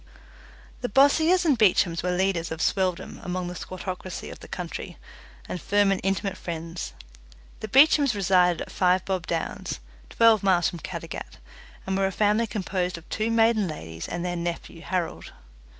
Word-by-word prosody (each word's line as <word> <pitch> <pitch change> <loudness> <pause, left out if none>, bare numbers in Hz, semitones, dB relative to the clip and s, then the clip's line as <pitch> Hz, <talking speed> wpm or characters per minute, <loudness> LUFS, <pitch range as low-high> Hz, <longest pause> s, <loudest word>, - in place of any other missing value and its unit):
The 245 - -2
Bossiers 315 - +4
and 285 -7 +3
Beechams 180 -5 +3
were 180 - -1
leaders 180 -2 0
of 160 - -4
swelldom 185 -1 -1
among 180 0 -3
the 175 - -5
squattocracy 185 0 -6
up - - -10
the - - -12
country, - - -6 0.5
and 180 - -5
firm 205 -1 +3
and 195 - 0
intimate 195 +1 -1
friends. 165 - -5 0.7
The 215 - -5
Beechams 275 +1 +5
resided 180 -3 +3
at - - -12
Five 185 0 +2
Bob 185 -3 -2
Downs, 165 -1 -3 0.3
twelve 230 -2 +5
miles 185 -4 +3
from 175 - -8
Caddagat, - - -7 0.5
and 190 - -1
were 195 0 +2
a - - -3
family 210 +3 +2
composed 185 -4 -2
of 170 - -13
two 220 +1 -1
maiden 225 -3 +3
ladies 80 - -7
and 175 0 -4
their 175 0 -2
nephew, 170 -1 -5
Harold. 180 -2 -3
185 Hz, 165 wpm, -26 LUFS, 175-210 Hz, 0.7 s, Beechams